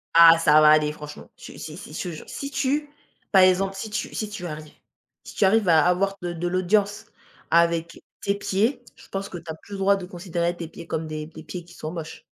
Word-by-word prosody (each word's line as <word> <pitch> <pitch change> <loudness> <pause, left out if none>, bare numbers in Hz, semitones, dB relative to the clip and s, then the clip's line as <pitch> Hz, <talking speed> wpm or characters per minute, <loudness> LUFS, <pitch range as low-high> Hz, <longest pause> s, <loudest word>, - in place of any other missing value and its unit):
Ah, 165 0 +9
ça 155 -2 +5
va 155 - +7
aller, 150 -1 +5
franchement. 150 0 -10
Je - - -11
si 155 - -8
si, 180 - -10
je - - -4
te 175 -3 -5
jure. - - -11
Si 280 0 -6
tu 280 +2 0 0.4
par 190 - +7
exemple, 185 +1 +4
si 210 +3 -5
tu 210 - -4
si 215 - -3
tu 205 -4 -7
arrives. 155 -2 -7 0.5
Si - - -11
tu - - +1
arrives 200 +1 +4
à 160 -1 +5
avoir 195 +2 +1
de 175 -1 -3
de 170 +1 -3
l'audience 195 +3 +1 0.4
avec 170 0 +2 0.2
tes 200 - 0
pieds, 205 +6 0
je - - -17
pense 195 0 -4
que 175 - -7
tu - - -18
as - - -6
plus 180 - -20
le 195 - -5
droit 195 +1 +4
de 190 -2 -6
considérer 175 -1 -2
tes 170 -1 -6
pieds 165 - -11
comme 160 -1 -3
des 155 0 -5
des 160 0 -12
pieds 175 +2 -7
qui 175 - -16
sont 155 - -6
moches. 165 -2 -7
175 Hz, 245 wpm, -24 LUFS, 160-195 Hz, 0.5 s, Ah